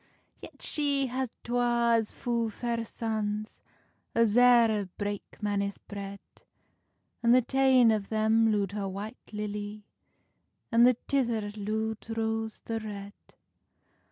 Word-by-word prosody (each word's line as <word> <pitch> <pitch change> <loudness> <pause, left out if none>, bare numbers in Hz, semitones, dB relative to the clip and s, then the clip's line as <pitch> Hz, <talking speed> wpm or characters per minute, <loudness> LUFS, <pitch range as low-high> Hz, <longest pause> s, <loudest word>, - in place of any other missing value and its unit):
Yet - - -11
she 285 -2 +1
had 260 0 -2
twa 240 -1 +2
as 225 -2 +1
fu 235 -2 -1
fair 235 +1 -2
sons 215 -1 -3 0.6
As 230 -2 +3
eer 230 -5 +5
brake 205 -1 -5
manis 200 -1 -1
bread, 200 -1 -8 1.0
And 235 +1 +5
the 255 - +5
tane 260 -2 +4
of 210 -2 -1
them 220 +1 +3
loed 200 -2 0
her 200 -1 -3
White 205 +5 -8
Lilly, 210 0 -5 0.9
And 235 +1 +6
the 250 -2 +3
tither 235 -6 0
lood 220 +1 -3 0.2
Rose 225 0 -2
the 225 -1 -2
Red. 205 -2 -7
220 Hz, 125 wpm, -29 LUFS, 205-235 Hz, 1.0 s, And